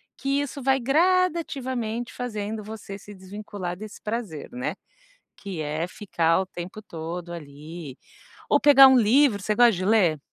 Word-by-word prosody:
que 275 Hz, +1 st, -1 dB
isso 285 Hz, 0 st, -4 dB
vai 265 Hz, +1 st, +2 dB
gradativamente 270 Hz, -6 st, 0 dB
fazendo 215 Hz, -3 st, -4 dB
você 210 Hz, -2 st, -8 dB
se 205 Hz, +1 st, -12 dB
desvincular 190 Hz, -1 st, -6 dB
desse 210 Hz, +2 st, -10 dB
prazer, 215 Hz, -8 st, -5 dB
né, 245 Hz, +1 st, -3 dB, 0.6 s
que 190 Hz, -5 st, -6 dB
é 155 Hz, +3 st, -2 dB
ficar 170 Hz, -4 st, 0 dB
o 190 Hz, -, -1 dB
tempo 180 Hz, +4 st, -8 dB
todo 170 Hz, -1 st, -7 dB
ali, 150 Hz, -1 st, -9 dB, 0.5 s
ou -, -, +4 dB
pegar 275 Hz, -2 st, +9 dB
um 265 Hz, -1 st, +6 dB
livro, 235 Hz, 0 st, +4 dB
você 210 Hz, +3 st, 0 dB
gosta 240 Hz, 0 st, +6 dB
de 185 Hz, 0 st, -3 dB
ler? 190 Hz, -8 st, +3 dB
210 Hz, 150 wpm, -25 LUFS, 175-250 Hz, 0.6 s, pegar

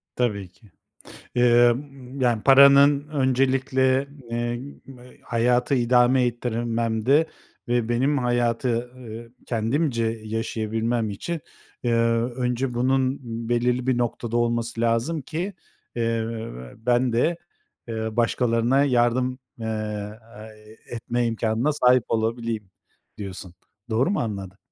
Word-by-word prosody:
Tabii 105 Hz, -7 st, -1 dB
ki. 105 Hz, +1 st, -23 dB, 0.6 s
Eee, 120 Hz, 0 st, +5 dB
ımm, 135 Hz, +1 st, -6 dB
yani, 120 Hz, -4 st, +2 dB
paranın 140 Hz, +1 st, +6 dB
öncelikle, 130 Hz, -1 st, +1 dB, 0.2 s
eee, 120 Hz, 0 st, -2 dB, 0.6 s
hayatı 120 Hz, +3 st, +1 dB
idame 125 Hz, +1 st, +4 dB
ettirmemde 120 Hz, +3 st, 0 dB, 0.4 s
ve 120 Hz, -1 st, +1 dB
benim 135 Hz, +5 st, +1 dB
hayatı, 120 Hz, 0 st, 0 dB
eee, 115 Hz, -2 st, -9 dB, 0.2 s
kendimce 115 Hz, +2 st, 0 dB, 0.2 s
yaşayabilmem 115 Hz, +1 st, -2 dB
için, 165 Hz, -, -4 dB, 0.4 s
eee, 120 Hz, -, 0 dB, 0.4 s
önce 125 Hz, 0 st, -1 dB
bunun 130 Hz, +2 st, +1 dB, 0.3 s
belirli 120 Hz, +1 st, +1 dB
bir 130 Hz, -2 st, +2 dB
noktada 120 Hz, -1 st, -2 dB
olması 120 Hz, -1 st, 0 dB
lazım 115 Hz, +7 st, 0 dB
ki, 175 Hz, +8 st, -4 dB, 0.4 s
eee, 115 Hz, -1 st, 0 dB, 0.5 s
ben 120 Hz, +2 st, +1 dB
de, 140 Hz, +9 st, +2 dB, 0.5 s
eee, 110 Hz, -1 st, -4 dB
başkalarına 120 Hz, +2 st, +2 dB
yardım, 125 Hz, 0 st, +1 dB, 0.2 s
eee, 115 Hz, -, -5 dB, 1.2 s
e -, -, -8 dB
etme 120 Hz, +1 st, -1 dB
imkânına 115 Hz, +4 st, 0 dB
sahip 125 Hz, -4 st, +4 dB
olabileyim, 115 Hz, -2 st, -2 dB, 0.5 s
diyorsun. 95 Hz, -3 st, -7 dB, 0.4 s
Doğru 120 Hz, +10 st, +2 dB
mu 205 Hz, -, 0 dB
anladım? 100 Hz, -4 st, -4 dB
120 Hz, 105 wpm, -24 LUFS, 115-130 Hz, 1.2 s, paranın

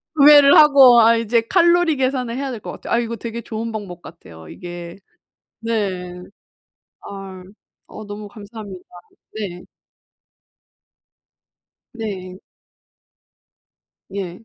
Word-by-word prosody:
구매를 285 Hz, -1 st, +7 dB
하고 275 Hz, -5 st, +7 dB
아 230 Hz, +1 st, +5 dB
이제 230 Hz, +1 st, +1 dB
칼로리 345 Hz, -3 st, +3 dB
계산을 255 Hz, -2 st, -2 dB
해야 275 Hz, -1 st, -4 dB
될 230 Hz, -, -7 dB
것 -, -, -8 dB
같아요. -, -, -6 dB
아 235 Hz, -, +3 dB
이거 235 Hz, 0 st, -4 dB
되게 235 Hz, +1 st, -7 dB
좋은 225 Hz, +1 st, -6 dB
방법 190 Hz, -5 st, -8 dB
같아요. 80 Hz, -, -14 dB
이게 175 Hz, 0 st, -9 dB, 0.6 s
네. 190 Hz, -6 st, -4 dB, 0.8 s
아. 195 Hz, -2 st, -10 dB, 0.4 s
어 215 Hz, -, -11 dB
너무 205 Hz, 0 st, -8 dB
감사합니다. 205 Hz, -3 st, -11 dB, 0.6 s
네. 180 Hz, -4 st, -6 dB, 2.3 s
네. 190 Hz, -5 st, -7 dB, 1.7 s
예. 190 Hz, +1 st, -7 dB
220 Hz, 200 characters per minute, -19 LUFS, 185-240 Hz, 2.3 s, 구매를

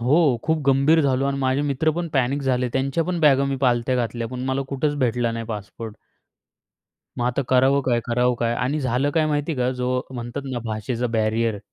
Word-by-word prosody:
हो. 135 Hz, 0 st, +3 dB
खूप 160 Hz, 0 st, +1 dB
गंभीर 140 Hz, +4 st, +4 dB
झालो 135 Hz, -1 st, +1 dB
आणि 140 Hz, 0 st, -1 dB
माझे 130 Hz, +1 st, +1 dB
मित्र 145 Hz, +2 st, +1 dB
पण 170 Hz, -1 st, -2 dB
पॅनिक 135 Hz, +1 st, +1 dB
झाले. 125 Hz, -1 st, 0 dB
त्यांच्या 135 Hz, +4 st, 0 dB
पण 180 Hz, -2 st, -2 dB
बॅगा 140 Hz, -2 st, +5 dB
मी 135 Hz, -1 st, -1 dB
पालथ्या 125 Hz, +1 st, +1 dB
घातल्या, 115 Hz, -1 st, -2 dB
पण 125 Hz, 0 st, -5 dB
मला 135 Hz, +1 st, 0 dB
कुठेच 145 Hz, +2 st, -1 dB
भेटला 120 Hz, -2 st, +1 dB
नाही 115 Hz, 0 st, -4 dB
पासपोर्ट. 110 Hz, 0 st, -7 dB, 1.2 s
मग 120 Hz, -, 0 dB
आता 125 Hz, +3 st, 0 dB
करावं 130 Hz, +2 st, +4 dB
काय, 120 Hz, -3 st, +1 dB
करावं 125 Hz, +1 st, +1 dB
काय 120 Hz, 0 st, +1 dB
आणि 135 Hz, +6 st, -1 dB
झालं 130 Hz, +2 st, 0 dB
काय 155 Hz, +1 st, +1 dB
माहिती 150 Hz, +1 st, -1 dB
आहे 135 Hz, -, -5 dB
का, 125 Hz, +1 st, +2 dB
जो 125 Hz, 0 st, -1 dB
म्हणतात 120 Hz, +3 st, -5 dB
ना 120 Hz, -, -2 dB
भाषेचा 115 Hz, +2 st, -2 dB
बॅरियर 110 Hz, 0 st, 0 dB
130 Hz, 200 wpm, -23 LUFS, 120-140 Hz, 1.2 s, बॅगा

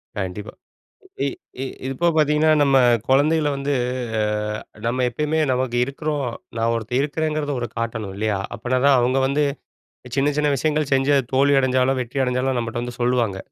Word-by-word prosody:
கண்டிப்பா. 105 Hz, +1 st, -5 dB, 0.7 s
இ -, -, +1 dB, 0.3 s
இ -, -, -1 dB, 0.3 s
இப்போ 170 Hz, +6 st, -1 dB
பார்த்தீங்கன்னா, 150 Hz, +1 st, +3 dB
நம்ம 135 Hz, -1 st, +4 dB, 0.3 s
குழந்தைகள 150 Hz, +3 st, +3 dB
வந்து 140 Hz, +1 st, -2 dB, 0.5 s
அ, 105 Hz, 0 st, -3 dB
நம்ம 125 Hz, +2 st, 0 dB
எப்பயுமே 150 Hz, +5 st, -1 dB
நமக்கு 125 Hz, -1 st, -1 dB
இருக்கிறோம். 145 Hz, +1 st, -3 dB, 0.3 s
நான் 115 Hz, +1 st, +1 dB
ஒருத்தன் 115 Hz, +3 st, -1 dB
இருக்கிறேங்கிறத 150 Hz, 0 st, -1 dB
ஒரு 120 Hz, -, -3 dB
காட்டணும், 110 Hz, -4 st, -3 dB
இல்லையா? 105 Hz, -2 st, 0 dB, 0.2 s
அப்பனா 125 Hz, +3 st, -1 dB
தான் 140 Hz, -, +6 dB
அவங்க 130 Hz, +2 st, +2 dB
வந்து, 145 Hz, +2 st, +1 dB, 0.7 s
சின்ன, 145 Hz, +2 st, +2 dB
சின்ன 150 Hz, -1 st, +2 dB
விஷயங்கள் 150 Hz, +1 st, 0 dB
செஞ்சு 135 Hz, +2 st, +3 dB
அது 135 Hz, -, 0 dB
தோல்வி 140 Hz, +1 st, +4 dB
அடைஞ்சாலும், 130 Hz, 0 st, +2 dB
வெற்றி 130 Hz, +2 st, -2 dB
அடைஞ்சாலும் 125 Hz, +1 st, 0 dB
நம்மட்ட 115 Hz, 0 st, -3 dB
வந்து 120 Hz, 0 st, -7 dB
சொல்லுவாங்க. 120 Hz, -5 st, +1 dB
130 Hz, 155 wpm, -22 LUFS, 120-145 Hz, 0.7 s, தான்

